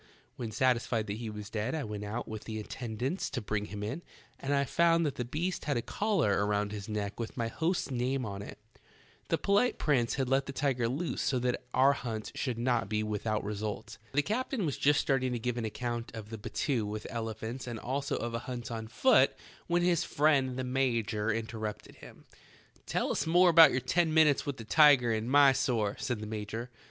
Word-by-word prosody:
When 120 -3 -5
satisfied 115 -1 +1
that 100 0 -4
he 115 -1 -5
was 105 0 -8
dead 115 +6 -2
I 155 - -2
went 105 -3 -5
out 105 +4 -4
with 110 -1 -7
the 110 -1 -5
attendants 120 - -3
to 140 - -3
bring 105 -2 -2
him 105 0 -6
in, 135 +11 -4 0.4
and 140 - -3
I 140 0 +3
found 170 +3 +3
that 145 - 0
the 125 - -3
beast 160 +9 -3
had 145 -4 0
a 120 - -2
collar 165 - +1
around 105 0 0
his 105 0 -6
neck 105 0 -3
with 115 +2 -5
my 115 -2 -1
host's 165 +2 -1
name 130 +1 -1
on 100 -1 -5
it. 100 - -9 0.7
The - - +2
polite 205 +5 +2
prince 125 -6 +1
had 135 -1 -1
let 135 +1 +1
the 140 - -5
tiger 130 -5 0
loose 155 +7 -2
so 130 - +1
that 125 0 -1
our 135 +2 +6
hunt 115 -6 -5
should 125 -4 -2
not 120 -4 0
be 110 0 0
without 110 0 -2
result." 105 +1 -5
The 145 +2 +3
captain 230 - -1
was 145 - -1
just 145 +1 +3
starting 130 -2 +1
to - - -1
give 125 +1 -2
an 115 - -2
account 120 +1 -4
of 110 0 -8
a - - -4
battue 120 +2 -1
with 105 +1 -5
elephants 115 +2 -5
and 120 -2 -4
also 135 +5 -2
of 120 0 -3
a 115 - -1
hunt 120 -2 -5
on 110 -1 -4
foot 250 - +4 0.3
when 175 0 +2
his 175 -1 +3
friend 140 -5 +2
the 130 - -2
major 115 -4 0
interrupted 110 -1 -5
him. - - -14 0.6
"Tell - - 0
us - - -1
about 170 -1 +8
your 130 - 0
ten 160 +5 +1
minutes 150 -3 +4
with 140 -2 -2
the 115 - -7
tiger 135 -3 +6
in 110 +2 -2
Mysore," 135 -6 +4
said 120 -4 -2
the - - -4
major. 110 +3 -5
120 Hz, 205 wpm, -31 LUFS, 110-140 Hz, 0.7 s, about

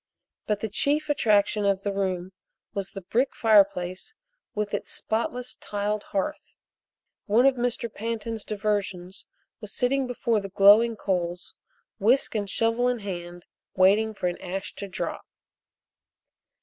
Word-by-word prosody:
But 210 -1 0
the 220 - -1
chief 290 +8 0
attraction 210 -6 +2
of 200 -1 +1
the 200 - -1
room 185 -2 -2 0.4
was 195 -1 -3
the 195 - -9
brick 240 +9 0
fireplace 200 - +2 0.4
with 210 -1 -2
its - - -3
spotless 245 +3 -2
tiled 205 0 -2
hearth. 200 +11 -3 0.7
One 225 +5 +4
of 275 - +6
Mr. 245 -1 -1
Pantin's 225 0 -4
diversions 200 -3 -3 0.3
was 210 -2 -8
sitting 265 +3 +1
before 235 -2 0
the 195 -1 -6
glowing 205 +4 +6
coals, 180 -3 -2 0.5
whisk 240 +7 +3
and 205 -3 -2
shovel 230 +4 +1
in 250 0 +1
hand, 175 -3 -6 0.3
waiting 210 +4 +4
for 185 - -4
an 175 -1 -2
ash 190 +1 -5
to 200 - -5
drop. 185 - -4
210 Hz, 135 wpm, -26 LUFS, 195-230 Hz, 0.7 s, of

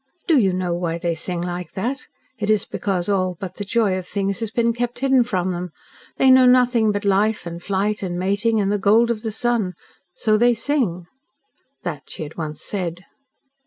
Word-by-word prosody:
"Do 320 -5 +4
you 195 -5 +3
know 180 -1 -1
why 170 -1 -2
they 170 0 -1
sing 170 +2 -3
like 175 -1 -5
that? 250 +8 -3 0.3
It 210 0 -2
is 215 -2 +3
because 185 -3 -2
all 185 -3 0
but 185 -2 -6
the 205 - -2
joy 205 -2 +1
of 180 - -10
things 195 -1 -1
has 225 -2 -2
been 235 +1 +1
kept 240 0 -3
hidden 265 -1 +3
from 185 -6 -1
them. 180 0 -4 0.5
They 265 - +5
knew 260 -1 +7
nothing 245 -3 +4
but 205 0 -3
life 205 +2 +2
and 170 0 -6
flight 200 +2 -1
and 180 -3 -3
mating, 200 +5 +1
and 200 -1 +1
the 205 - 0
gold 220 +4 +4
of 220 -2 -3
the 220 -1 -3
sun. 220 -4 0 0.4
So 215 -1 +2
they 240 +1 +4
sing." 220 - -1 0.8
That 155 -6 -5
she - - -6
had 155 +1 -9
once 155 -2 -5
said. 180 -3 -4
200 Hz, 200 wpm, -21 LUFS, 180-230 Hz, 0.8 s, knew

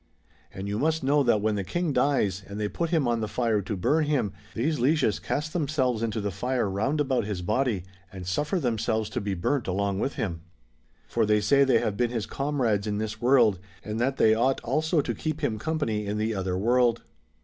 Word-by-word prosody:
And 95 +1 -6
you 105 +1 -2
must 160 0 +1
know 145 +2 +3
that 120 -6 +3
when 110 0 +2
the 100 -1 -2
King 160 - -1
dies, 105 -11 +1
and 100 +1 -7
they 105 - 0
put 170 +10 -2
him 160 -6 +2
on 120 -1 +1
the 110 - -1
fire 115 -3 0
to 100 +1 -4
burn 150 - +2
him, 130 -10 0 0.2
these 150 +6 0
Lieges 135 -4 +2
cast 155 +1 -3
themselves 140 -8 0
into 115 -1 -1
tlie 100 -1 -2
fire 125 +4 -1
round 110 +10 -1
about 135 -4 +1
his 100 -4 -4
body, 110 -1 0 0.3
and 95 -1 -8
suffer 150 - 0
themselves 110 -4 -1
to - - -2
be 100 -1 -2
burnt 120 +9 -1
along 100 +1 -1
with 135 - -1
him. 85 -6 -3 0.7
For 115 - 0
they 105 0 +3
say 135 +7 +4
they 130 -3 +4
have 100 -2 -2
been 120 0 +1
his 115 -3 -2
comrades 125 -8 -1
in 105 -1 -1
this 105 0 -4
world, 120 -6 +4 0.2
and 110 +1 -4
that 130 +3 0
they 110 - +5
ought 130 +4 +2
also 155 +6 +1
to - - -3
keep 155 -1 -4
him 110 -7 -1
com 160 +9 -2
pany 110 -8 -1
in 105 +1 -2
the 110 +1 0
other 95 -2 -2
world. 120 +2 +2
115 Hz, 220 wpm, -27 LUFS, 105-140 Hz, 0.7 s, they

